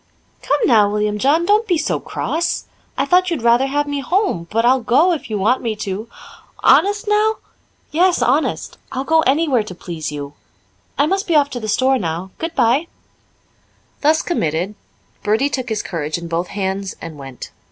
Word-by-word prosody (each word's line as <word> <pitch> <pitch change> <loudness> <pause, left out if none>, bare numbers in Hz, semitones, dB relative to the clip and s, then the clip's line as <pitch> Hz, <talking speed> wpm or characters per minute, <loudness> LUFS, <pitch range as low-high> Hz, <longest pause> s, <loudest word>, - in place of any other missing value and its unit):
"Come 285 - +1
now, 215 -4 +5
William 210 0 -1
John, 300 +8 +3
don't 425 +4 +3
be 355 -4 +2
so - - -1
cross. 340 +2 -2 0.3
I - - +1
thought 365 0 +3
you'd 330 -9 -3
rather 235 +3 +4
have 290 +2 0
me 285 -1 -2
home, 275 - 0
but 230 +2 +1
I'll 260 +2 +4
go, 265 +10 +3
if 300 - -5
you 215 - -1
want 220 +7 +2
me 225 -3 -2
to." 210 +1 -5 0.5
"Honest, 410 +3 +4
now?" 425 +1 +3 0.6
"Yes, 355 +3 +3
honest. 280 +6 0
I'll 265 0 -2
go 320 +3 +3
anywhere 275 -3 +2
to 210 -4 -8
please 165 -4 -6
you. 145 -1 -6 0.6
I 285 - +4
must 390 +6 -1
be 335 - +1
off 285 -1 +3
to 245 - -4
the 220 - -5
store 260 +4 +2
now. 175 +1 -4
Goodbye." 295 -2 +1 1.1
Thus 310 +2 +3
committed, 175 - -1 0.5
Bertie 225 +7 +1
took 260 -3 -3
his 220 -2 -2
courage 155 -3 -3
in 170 0 -7
both 170 +2 -2
hands 195 -1 -3
and 160 -3 -9
went. 135 -2 -9
250 Hz, 180 wpm, -19 LUFS, 195-320 Hz, 1.1 s, now